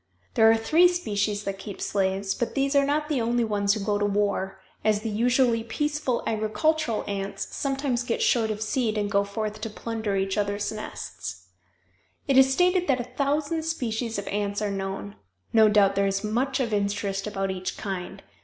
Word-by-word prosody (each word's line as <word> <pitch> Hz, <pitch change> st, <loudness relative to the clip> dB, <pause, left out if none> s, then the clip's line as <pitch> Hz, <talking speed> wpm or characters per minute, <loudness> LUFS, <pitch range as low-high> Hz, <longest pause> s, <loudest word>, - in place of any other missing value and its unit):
There 225 Hz, 0 st, +6 dB
are 225 Hz, -, +5 dB
three 320 Hz, +10 st, +5 dB
species 210 Hz, -, -1 dB
that 195 Hz, -1 st, -4 dB
keep 200 Hz, 0 st, -8 dB
slaves, 195 Hz, 0 st, 0 dB
but 240 Hz, -, -3 dB
these 275 Hz, 0 st, +1 dB
are 280 Hz, 0 st, +4 dB
not 300 Hz, +1 st, 0 dB
the 290 Hz, -5 st, 0 dB
only 235 Hz, +1 st, +1 dB
ones 205 Hz, -2 st, +1 dB
who -, -, -3 dB
go 205 Hz, -1 st, +1 dB
to 205 Hz, -, +1 dB
war, 200 Hz, -1 st, -1 dB, 0.2 s
as 210 Hz, -1 st, +2 dB
the 220 Hz, 0 st, -3 dB
usually 235 Hz, +1 st, +2 dB
peaceful 295 Hz, +1 st, -1 dB
agricultural 225 Hz, +4 st, 0 dB
ants 195 Hz, -1 st, -4 dB
sometimes 270 Hz, -3 st, -1 dB
get 245 Hz, -2 st, -2 dB
short 225 Hz, -3 st, +2 dB
of 215 Hz, 0 st, -2 dB
seed 220 Hz, 0 st, 0 dB
and 205 Hz, -1 st, -1 dB
go 200 Hz, -1 st, +3 dB
forth 215 Hz, +1 st, -4 dB
to 225 Hz, -, -3 dB
plunder 220 Hz, -1 st, -3 dB
each 195 Hz, +1 st, 0 dB
other's 205 Hz, 0 st, -1 dB
nests. 95 Hz, -, -7 dB, 0.8 s
It 275 Hz, -, +3 dB
is 265 Hz, 0 st, +7 dB
stated 360 Hz, +4 st, +3 dB
that 270 Hz, -3 st, +2 dB
a 250 Hz, +1 st, -6 dB
thousand 295 Hz, +4 st, 0 dB
species 240 Hz, -8 st, -2 dB
of 200 Hz, -, -5 dB
ants 205 Hz, 0 st, -1 dB
are 210 Hz, -1 st, -1 dB
known. 195 Hz, -, -4 dB, 0.4 s
No 220 Hz, -1 st, +6 dB
doubt 205 Hz, -2 st, +4 dB
there 200 Hz, 0 st, +2 dB
is 195 Hz, +1 st, -1 dB
much 255 Hz, +6 st, 0 dB
of 235 Hz, -4 st, -1 dB
interest 200 Hz, -1 st, -1 dB
about 195 Hz, -2 st, -2 dB
each 185 Hz, 0 st, -4 dB
kind. 190 Hz, -3 st, -5 dB
215 Hz, 190 wpm, -26 LUFS, 200-255 Hz, 0.8 s, is